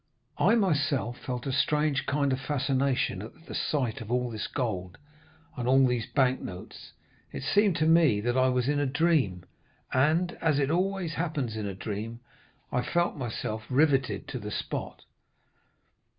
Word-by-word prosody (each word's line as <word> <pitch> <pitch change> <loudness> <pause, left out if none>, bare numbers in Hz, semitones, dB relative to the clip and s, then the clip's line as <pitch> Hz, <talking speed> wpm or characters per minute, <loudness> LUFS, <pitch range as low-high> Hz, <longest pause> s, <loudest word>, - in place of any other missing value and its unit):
I - - +5
myself 145 - +1
felt 125 -1 -5
a 135 - -1
strange 145 +1 +1
kind 140 -1 +1
of 130 - -1
fascination 135 -6 0
at 115 +10 -11
the - - -8
sight 130 -8 -1
of 110 0 -7
all 125 -1 0
this 105 -2 -4
gold 95 -9 -3 0.6
and 125 -1 -3
all 135 +1 +5
these 125 -3 0
bank 130 -2 +2
notes; 90 -1 -9 0.4
it - - -6
seemed 200 +5 +3
to 155 - +1
me 160 -9 +5
that 120 +4 -1
I 130 0 +4
was 125 -1 +1
in 145 0 +1
a 145 - +1
dream, 135 - +1 0.5
and, 160 +7 +3
as 155 -3 +2
it 140 0 +1
always 185 -1 0
happens 150 -9 -2
in 105 -2 -3
a 100 - -5
dream, 110 +4 -5 0.5
I 125 - +1
felt 175 +6 0
myself 110 -4 -4
riveted 135 -1 +2
to 125 - -4
the 105 -1 -6
spot. - - -4
130 Hz, 165 wpm, -28 LUFS, 120-150 Hz, 0.6 s, I